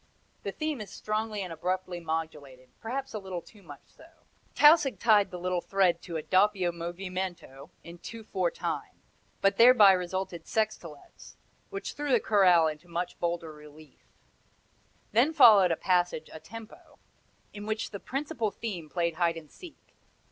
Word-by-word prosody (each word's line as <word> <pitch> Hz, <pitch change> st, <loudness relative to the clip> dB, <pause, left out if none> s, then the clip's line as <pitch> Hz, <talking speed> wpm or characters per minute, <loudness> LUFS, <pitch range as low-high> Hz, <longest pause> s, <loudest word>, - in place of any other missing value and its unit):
The -, -, -4 dB
theme 310 Hz, -6 st, -3 dB
is 205 Hz, -, -8 dB
strongly 215 Hz, 0 st, -3 dB
and 180 Hz, -3 st, -6 dB
abruptly 180 Hz, +1 st, -3 dB
modulated, 150 Hz, -6 st, -5 dB
perhaps 270 Hz, +4 st, -5 dB
a 215 Hz, -, -3 dB
little 185 Hz, -3 st, -6 dB
too 210 Hz, -, -18 dB
much 145 Hz, -6 st, -13 dB
so. 320 Hz, -, -19 dB, 0.5 s
Tausig 295 Hz, -2 st, +6 dB
tied 210 Hz, -4 st, +4 dB
the 180 Hz, -, -7 dB
little 180 Hz, 0 st, -2 dB
thread 185 Hz, -3 st, +1 dB
to 170 Hz, -3 st, -5 dB
a 155 Hz, -, -5 dB
doppio 190 Hz, -2 st, +2 dB
movimento 175 Hz, -4 st, -6 dB
in 170 Hz, +1 st, -11 dB
two 230 Hz, +4 st, -9 dB
four 185 Hz, -4 st, -1 dB
time, -, -, -5 dB, 0.4 s
but 195 Hz, -, +2 dB
thereby 230 Hz, -4 st, +8 dB
resulted 180 Hz, -2 st, -3 dB
sextolets, 185 Hz, -9 st, -4 dB, 0.3 s
which 395 Hz, 0 st, -6 dB
threw 290 Hz, -1 st, -3 dB
the 245 Hz, -, +5 dB
chorale 185 Hz, -6 st, +4 dB
into 155 Hz, +2 st, -4 dB
still 175 Hz, +1 st, -3 dB
bolder 170 Hz, -2 st, -3 dB
relief. 150 Hz, -1 st, -16 dB, 1.1 s
Then 245 Hz, +9 st, +3 dB
followed 215 Hz, -, +7 dB
a 165 Hz, -, 0 dB
passage 175 Hz, -3 st, 0 dB
a 160 Hz, -, -8 dB
tempo, 225 Hz, +5 st, -13 dB, 0.6 s
in 205 Hz, 0 st, -8 dB
which 220 Hz, +1 st, -3 dB
the 200 Hz, -, -6 dB
principal 255 Hz, -4 st, -3 dB
theme 190 Hz, -6 st, -6 dB
played 170 Hz, -1 st, -2 dB
hide 170 Hz, -2 st, +1 dB
and 155 Hz, -2 st, -12 dB
seek. 355 Hz, -3 st, -15 dB
185 Hz, 155 wpm, -28 LUFS, 170-215 Hz, 1.1 s, thereby